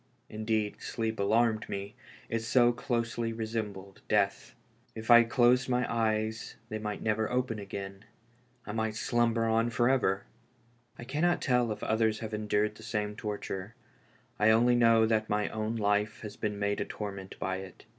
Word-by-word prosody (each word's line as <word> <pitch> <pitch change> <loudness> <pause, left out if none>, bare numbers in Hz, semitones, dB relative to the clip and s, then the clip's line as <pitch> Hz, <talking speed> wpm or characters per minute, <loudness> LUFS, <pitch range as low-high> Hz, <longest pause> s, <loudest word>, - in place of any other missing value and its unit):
Indeed, 110 -1 -2
sleep 110 -1 -3
alarmed 110 +2 +2
me, 100 0 -5 0.3
it 115 - -1
so 120 +1 +4
closely 115 -1 -2
resembled 110 -4 -5
death. - - 0 0.4
If 110 +1 -2
I 120 0 +10
closed 125 +2 +3
my 125 0 +2
eyes 110 -1 -1
they 110 - -3
might 105 -1 -4
never 110 0 0
open 125 -3 -1
again 100 0 -7 0.3
— 125 0 -36
I - - -5
might 110 0 -2
slumber 115 0 +1
on 115 +1 +2
forever 120 -4 +2 0.7
I - - -8
I - - -10
cannot 155 +7 +1
tell 125 -3 +1
if 105 - -5
others 110 0 +1
have 110 -1 -6
endured 105 0 0
the 110 - -15
same 105 -2 -3
torture; 105 -1 -5 0.6
I 105 +1 +5
only 120 +3 +5
know 115 -2 +5
that 110 -1 +1
my 105 0 0
own 110 +1 -3
life 105 0 0
has 105 -1 -7
been 105 -2 -3
made 100 0 -1
a - - -1
torment 100 -2 -7
by 95 0 -2
it. 95 -1 -10
110 Hz, 165 wpm, -30 LUFS, 105-115 Hz, 0.7 s, I